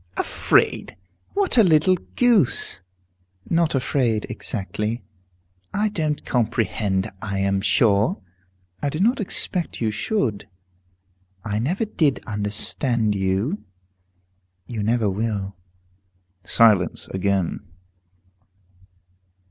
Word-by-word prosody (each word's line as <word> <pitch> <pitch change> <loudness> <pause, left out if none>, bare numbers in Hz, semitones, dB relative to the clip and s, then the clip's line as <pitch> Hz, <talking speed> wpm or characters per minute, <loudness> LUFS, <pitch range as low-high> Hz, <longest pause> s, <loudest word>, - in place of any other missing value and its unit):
"Afraid! - - +1 0.4
What 390 -11 +3
a - - +8
little 170 +1 +4 0.2
goose!" 210 - +4 0.7
"Not 165 -2 +1
afraid, 125 -4 0
exactly." 105 +2 -3 0.7
"I 210 +1 +1
don't 155 -6 -2
comprehend, 105 -4 0
I 100 -2 -3
am 100 0 +1
sure." 105 0 +2 0.6
"I 145 - 0
do 155 - -4
not 240 +7 +2
expect 180 -2 -3
you 110 -2 0
should." 110 - -2 1.0
"I 105 -1 -1
never 180 - -1
did 155 -9 +1
understand 105 +2 -1
you." 100 - -1 1.0
"You 115 -3 -5
never 110 +1 +1
will." 100 -1 -2 0.9
Silence 105 -7 +3
again. 95 -2 -1
115 Hz, 90 wpm, -23 LUFS, 100-155 Hz, 1.0 s, a